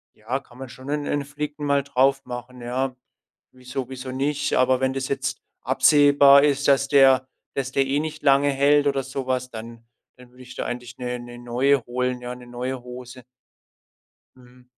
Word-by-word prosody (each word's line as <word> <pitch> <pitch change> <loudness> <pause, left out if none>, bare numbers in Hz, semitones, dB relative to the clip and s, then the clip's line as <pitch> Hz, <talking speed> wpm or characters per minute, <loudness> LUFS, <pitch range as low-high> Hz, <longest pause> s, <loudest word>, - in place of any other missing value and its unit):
ja, 120 +5 -3
kann 125 -2 -19
man 135 -1 -7
schon 130 +3 -11
'n 150 0 -2
'n 145 -1 -1
Flicken 150 +1 -5
mal 140 -1 +2
drauf 135 0 +2
machen, 125 0 -8
ja. 130 +2 -2 0.6
Wieso 130 0 -6
wieso 130 0 -7
nicht? 145 +2 -1
Aber 130 0 +3
wenn 130 0 +1
das 135 -1 -3
jetzt 140 0 -2 0.2
absehbar 140 +1 +6
ist, 145 -1 +1
dass 140 0 +4
der 135 -2 +5 0.3
dass 135 -1 -2
der 135 0 +2
eh 140 +2 +1
nicht 155 0 -5
lange 140 0 +4
hält 145 +1 +3
oder 135 -1 0
so 135 0 -6
was, 130 -1 -2
dann 115 +1 -9 0.3
dann 125 -1 -16
würde 130 +1 -15
ich 125 0 -12
da - - -4
eigentlich 125 0 -6
'ne 125 0 -4
ne 120 0 -10
neue 125 +2 +1
holen 125 0 -2
ja, 125 0 -6
'ne 125 - -13
neue 125 +1 -5
Hose. 125 0 -10 1.1
Mhm. 125 0 -20
130 Hz, 185 wpm, -23 LUFS, 125-140 Hz, 1.1 s, absehbar